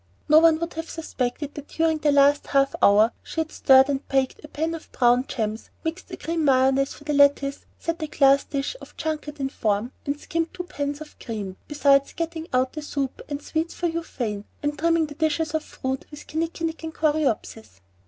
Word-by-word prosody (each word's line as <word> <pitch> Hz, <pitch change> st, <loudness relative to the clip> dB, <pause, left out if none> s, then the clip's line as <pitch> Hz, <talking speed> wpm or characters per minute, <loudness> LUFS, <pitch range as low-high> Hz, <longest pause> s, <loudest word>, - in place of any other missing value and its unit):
No 305 Hz, +1 st, +8 dB
one 325 Hz, -1 st, +5 dB
would 335 Hz, +1 st, -4 dB
have 325 Hz, +1 st, -5 dB
suspected 285 Hz, -3 st, -3 dB
that 290 Hz, -1 st, -9 dB
during 320 Hz, -1 st, +1 dB
the 300 Hz, -1 st, +3 dB
last 285 Hz, +1 st, +4 dB
half 275 Hz, -1 st, +2 dB
hour 210 Hz, +3 st, +6 dB
she -, -, -6 dB
had 315 Hz, -1 st, -1 dB
stirred 265 Hz, 0 st, +6 dB
and 275 Hz, -1 st, -2 dB
baked 270 Hz, +1 st, 0 dB
a -, -, -8 dB
pan 320 Hz, +2 st, -2 dB
of 330 Hz, -, -9 dB
brown 245 Hz, +1 st, +3 dB
"gems," 220 Hz, -2 st, -3 dB, 0.2 s
mixed 325 Hz, +3 st, -4 dB
a -, -, -7 dB
cream 330 Hz, -1 st, -2 dB
mayonnaise 270 Hz, 0 st, +3 dB
for -, -, -14 dB
the 300 Hz, 0 st, -2 dB
lettuce, 280 Hz, 0 st, +3 dB
set 335 Hz, 0 st, -3 dB
a 310 Hz, -, -2 dB
glass 275 Hz, -1 st, +4 dB
dish 280 Hz, -, -3 dB
of -, -, -14 dB
"junket" 305 Hz, -2 st, -3 dB
to 275 Hz, -3 st, -2 dB
form, 215 Hz, -1 st, -1 dB, 0.2 s
and 285 Hz, +1 st, -1 dB
skimmed 330 Hz, +1 st, -2 dB
two 360 Hz, -, -4 dB
pans 290 Hz, -4 st, -4 dB
of 305 Hz, -, -11 dB
cream, 205 Hz, -5 st, -5 dB
beside 280 Hz, -2 st, +3 dB
getting 330 Hz, -1 st, -4 dB
out 255 Hz, 0 st, +1 dB
the 305 Hz, -, -5 dB
soup 280 Hz, -3 st, -3 dB
and 290 Hz, 0 st, -4 dB
sweets 320 Hz, +1 st, -2 dB
for 350 Hz, -, 0 dB
Euphane, 245 Hz, -11 st, -3 dB, 0.2 s
and 290 Hz, 0 st, -1 dB
trimming 330 Hz, 0 st, +3 dB
the 295 Hz, -, -8 dB
dishes 315 Hz, +1 st, 0 dB
of 315 Hz, -1 st, 0 dB
fruit 265 Hz, 0 st, -4 dB
with 295 Hz, -1 st, -11 dB
kinnikinick 330 Hz, +1 st, -3 dB
and 320 Hz, 0 st, -6 dB
coreopsis. 285 Hz, -, -1 dB
290 Hz, 205 wpm, -24 LUFS, 270-320 Hz, 0.2 s, No